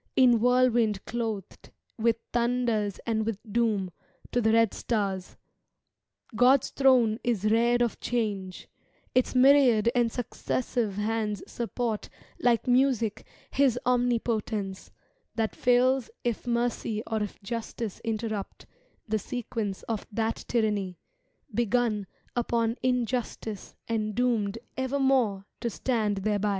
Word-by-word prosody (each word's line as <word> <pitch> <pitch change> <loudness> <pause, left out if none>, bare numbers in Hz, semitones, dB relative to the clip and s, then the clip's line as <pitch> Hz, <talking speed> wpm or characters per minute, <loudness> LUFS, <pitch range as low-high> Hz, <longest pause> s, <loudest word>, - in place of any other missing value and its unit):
In 245 -3 +6
whirlwind 240 -4 +3
clothed, 220 -5 -4 0.3
with 230 0 +2 0.2
thunders 235 -4 +1
and 220 -1 0
with 220 -2 -2 0.2
doom. 215 -6 +1 0.4
To 245 - +1
the 220 -1 +3
red 230 -1 +4
stars: 195 -5 -2 1.0
God's 255 +4 +4
throne 250 -5 +4
is 230 -5 0
reared 240 +2 +3
of 235 - -2
Change; 205 -6 -3 0.5
Its 255 +1 +2
myriad 255 -4 +6
and 240 -2 +2
successive 240 -3 -2
hands 210 -1 -1
support 235 -2 -3 0.3
like 235 -2 +2
music 250 -4 +2 0.2
His 270 -3 +3
omnipotence, 230 -5 0 0.5
that 225 -2 -1
fails 250 +1 +3
If 240 0 -2
mercy 235 -2 -1
or 220 -1 -2
if 210 - -4
justice 230 -1 -5
interrupt 220 -2 -4 0.4
The 215 0 0
sequence 225 -4 -4
of 225 -3 -4
that 225 +1 -2
tyranny, 210 -6 0 0.6
begun 230 -3 +1 0.3
Upon 230 -1 +1
injustice 240 -4 -2
and 215 -2 -1
doomed 230 -4 +1 0.2
evermore 260 -6 +1
To 235 - -1
stand 220 -3 0
thereby. 210 0 +1
230 Hz, 115 wpm, -28 LUFS, 215-245 Hz, 1.0 s, In